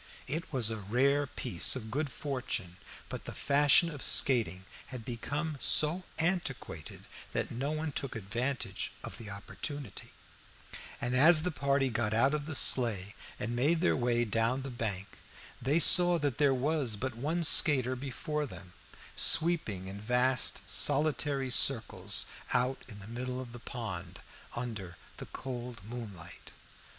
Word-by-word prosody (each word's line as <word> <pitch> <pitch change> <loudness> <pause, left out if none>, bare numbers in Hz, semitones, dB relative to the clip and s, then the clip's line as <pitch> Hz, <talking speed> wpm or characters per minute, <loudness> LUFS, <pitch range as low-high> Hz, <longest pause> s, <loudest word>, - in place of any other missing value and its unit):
It 160 +6 -4
was 120 -6 +1
a 110 - -3
rare 135 +8 +1
piece 120 -8 +1
of 110 -4 -7
good 145 +2 -2
fortune, 125 -12 -4 0.3
but - - -7
the - - -7
fashion 145 +4 +4
of 145 -3 -8
skating 115 -8 +3 0.2
had 125 -4 -9
become 145 +5 -4
so 160 +8 +2
antiquated 165 - -3 0.3
that - - -2
no 135 +5 -2
one 155 0 -3
took 135 -2 -4
advantage 120 +6 -3
of - - -8
the 110 -2 -9
opportunity; 130 +7 -7 0.9
and 120 +1 -2
as 155 +4 +6
the 180 - -1
party 140 -2 0
got 110 -1 -1
out 135 +5 +3
of 150 -1 -3
the 155 - -2
sleigh 105 -8 +4 0.3
and 115 +3 -3
made 150 +7 +2
their - - +2
way 120 -1 +1
down 115 +4 0
the 135 - -6
bank, 100 -5 -5 0.4
they 140 +5 +1
saw 175 +1 +8
that 145 -5 -2
there 145 -2 +4
was 135 -2 0
but 130 +5 -4
one 155 +8 -2
skater 130 -5 +4
before 145 +3 -4
them, 90 -4 -11 0.4
sweeping 155 - +3
in 100 +1 -8
vast 125 +3 +1
solitary 145 -2 0
circles 125 -2 +3 0.3
out 130 +2 0
in 105 -5 -10
the 100 - -10
middle 125 +2 -5
of 125 -2 -8
the 120 - -10
pond, 95 -8 -7 0.4
under 110 -8 -5 0.2
the - - -9
cold 125 -3 -7
moonlight. 105 -7 -9
130 Hz, 150 wpm, -31 LUFS, 115-145 Hz, 0.9 s, saw